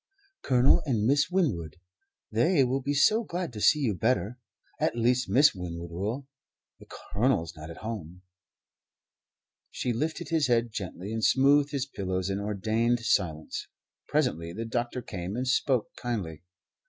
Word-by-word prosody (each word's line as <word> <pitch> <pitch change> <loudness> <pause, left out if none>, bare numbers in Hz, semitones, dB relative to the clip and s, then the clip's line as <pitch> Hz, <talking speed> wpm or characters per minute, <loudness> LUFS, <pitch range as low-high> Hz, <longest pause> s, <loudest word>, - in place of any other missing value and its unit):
"Colonel 125 0 +4
and 110 -6 +1
Miss 140 +5 +3
Winwood. 135 - 0 0.6
They 135 - +3
will 130 +2 0
be 140 +2 -1
so 215 +11 +4
glad 175 - -4
to 105 - -6
see 150 +7 +5
you 120 -7 +1
better 110 +2 0 0.4
at - - +1
least 125 0 +2
Miss 135 +9 +5
Winwood 85 -2 -6
will; 105 +10 -3 0.5
the - - -15
Colonel's 100 - -1
not 75 0 -9
at 85 - -9
home." 90 -5 -6 1.5
She 125 - -2
lifted 155 +8 -3
his 160 -4 +2
head 120 -1 +2
gently 100 0 -5
and 110 0 -3
smoothed 140 +3 +4
his 140 -3 -2
pillows, 95 -7 -3
and 100 +1 -2
ordained 110 +4 0
silence. 85 -8 -1 0.4
Presently 85 +2 0
the 115 +5 -4
doctor 120 +2 -2
came, 95 -3 -5
and 130 +2 -2
spoke 125 -2 +1
kindly. 95 -11 -4
115 Hz, 150 wpm, -28 LUFS, 95-135 Hz, 1.5 s, see